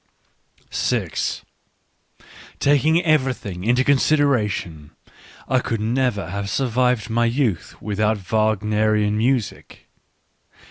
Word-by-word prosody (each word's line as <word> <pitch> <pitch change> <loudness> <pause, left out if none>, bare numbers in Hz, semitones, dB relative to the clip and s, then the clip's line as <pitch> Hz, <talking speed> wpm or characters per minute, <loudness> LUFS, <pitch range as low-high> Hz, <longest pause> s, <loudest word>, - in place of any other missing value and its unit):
> - - -4 1.3
Taking 155 +4 +3
everything 130 - 0
into 125 +4 +2
consideration, 125 - 0 0.5
I 130 - +2
could 115 -3 -3
never 110 -5 -1
have 100 +1 -4
survived 125 -2 0
my 120 +1 +2
youth 115 - -1
without 105 +1 0
Wagnerian 105 +1 +1
music. 120 0 -2
115 Hz, 85 wpm, -21 LUFS, 105-130 Hz, 1.3 s, Taking